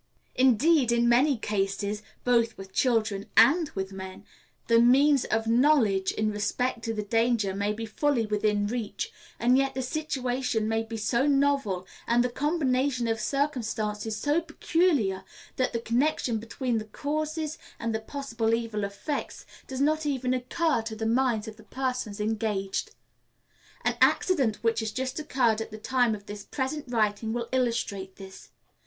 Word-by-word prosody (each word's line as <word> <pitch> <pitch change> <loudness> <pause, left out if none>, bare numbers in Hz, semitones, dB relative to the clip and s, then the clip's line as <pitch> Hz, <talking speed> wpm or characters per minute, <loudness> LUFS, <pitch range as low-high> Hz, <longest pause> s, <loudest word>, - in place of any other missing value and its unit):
Indeed, 260 +2 +4
in 235 0 +3
many 255 +3 +4
cases, 200 0 -2 0.2
both 235 -2 +2
with 195 0 -10
children 220 -5 +1
and 295 +7 +6
with 190 0 -3
men, 190 0 -8 0.4
the 230 0 +4
means 270 +3 +5
of 225 0 0
knowledge 230 -6 +3
in 215 0 -1
respect 230 +4 -1
to 225 - -1
the 210 - -2
danger 225 -2 +1
may 200 +1 -1
be 225 +2 -4
fully 240 +2 0
within 210 -1 +1
reach, 225 -1 -3 0.3
and 250 +2 +4
yet 270 -1 0
the 260 - -2
situation 255 -5 -1
may 225 0 +1
be 225 0 -6
so 235 +5 +1
novel, 275 -10 +1 0.2
and 240 +1 +3
the 250 - -1
combination 265 -3 0
of 225 0 0
circumstances 220 -6 -2
so 295 +8 +1
peculiar, 315 - +1 0.3
that 255 -1 +1
the 230 - -2
connection 235 0 0
between 230 +1 -2
the 215 - -7
causes 310 +5 -3 0.2
and 230 -1 -2
the 220 - -1
possible 230 -2 -1
evil 225 -3 -3
effects 200 +9 -4 0.2
does 265 0 -4
not 310 +2 +2
occur 260 +1 0
to 225 0 -6
the 220 +1 -4
minds 235 -2 +1
of 215 -1 -8
the 220 - -15
persons 250 -2 -3
engaged. 210 -2 -1 1.0
An - - +2
accident 265 - +3
which 230 0 +2
has 220 -1 -2
just 260 +4 -3
occurred 245 -7 +1
at 225 - -5
the 215 - -8
time 245 0 +1
of 200 -1 -12
this 205 -1 -7
present 285 +5 -3
writing 220 -2 0
will 235 -1 -3
illustrate 230 -7 -1
this. 190 -1 -12
235 Hz, 160 wpm, -27 LUFS, 215-265 Hz, 1.0 s, and